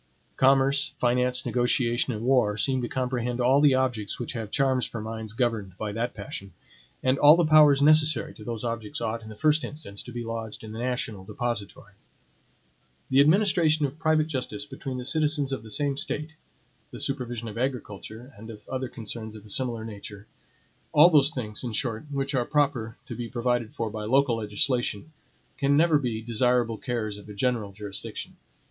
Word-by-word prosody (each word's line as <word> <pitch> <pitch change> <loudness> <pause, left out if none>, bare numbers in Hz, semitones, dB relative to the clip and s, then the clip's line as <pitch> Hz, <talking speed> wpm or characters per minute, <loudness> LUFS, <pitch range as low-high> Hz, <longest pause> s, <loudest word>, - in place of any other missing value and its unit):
Commerce, 135 +1 +3
finance, 125 +1 +1
negotiation, 120 0 +1
and 110 0 -4
war 125 -6 +3
seem 130 +2 +1
to 120 - -2
comprehend 125 -1 -2
all 130 +3 +4
the 145 -3 +5
objects 125 -6 -1
which 120 - -4
have 110 -4 -5
charms 130 0 +1
for 115 - -4
minds 110 0 -6
governed 115 -6 -1
by 105 -1 -3
that 115 +4 -3
passion; 100 -2 -7 0.5
and 130 +1 +2
all 150 +2 +8
the 175 -1 +2
powers 150 -2 +6
necessary 155 -2 +4
to 105 - -12
those 115 0 -5
objects 115 -3 -4
ought, 115 0 -2
in 110 - -11
the 110 - -9
first 155 +5 +2
instance, 145 -10 -7
to 125 - -9
be 120 0 -5
lodged 115 -1 -6
in 110 - -8
the 110 - -7
national 120 -5 -3
depository. 105 0 -5 1.2
The 130 - +5
administration 160 -1 +4
of 140 +3 -6
private 155 -1 +3
justice 140 -1 -4
between 135 -2 -6
the 125 - -5
citizens 150 -1 +1
of 135 - -3
the 110 - -12
same 140 +2 0
State, 150 +2 -1 0.6
the - - -9
supervision 120 -4 -3
of 105 - -7
agriculture 120 -1 -5
and 110 +2 -11
of 105 -2 -11
other 130 -1 -3
concerns 110 -1 -5
of 105 -1 -12
a - - -11
similar 115 -1 0
nature, 105 -1 -9 0.7
all 165 +4 +8
those 150 -4 +6
things, 105 -4 -3
in 120 -2 -4
short, 115 +3 -2
which 140 -1 -2
are 125 -2 +2
proper 130 -5 0
to - - -7
be 120 -1 -5
provided 120 -2 -1
for 115 -2 -3
by 105 -1 -5
local 130 0 +3
legislation, 115 +4 -1 0.5
can 140 0 +3
never 160 -1 +4
be 115 -5 -3
desirable 120 0 +1
cares 110 -5 -3
of 105 - -14
a 105 - -8
general 115 -2 -1
jurisdiction. 100 -1 -7
120 Hz, 185 wpm, -26 LUFS, 110-140 Hz, 1.2 s, all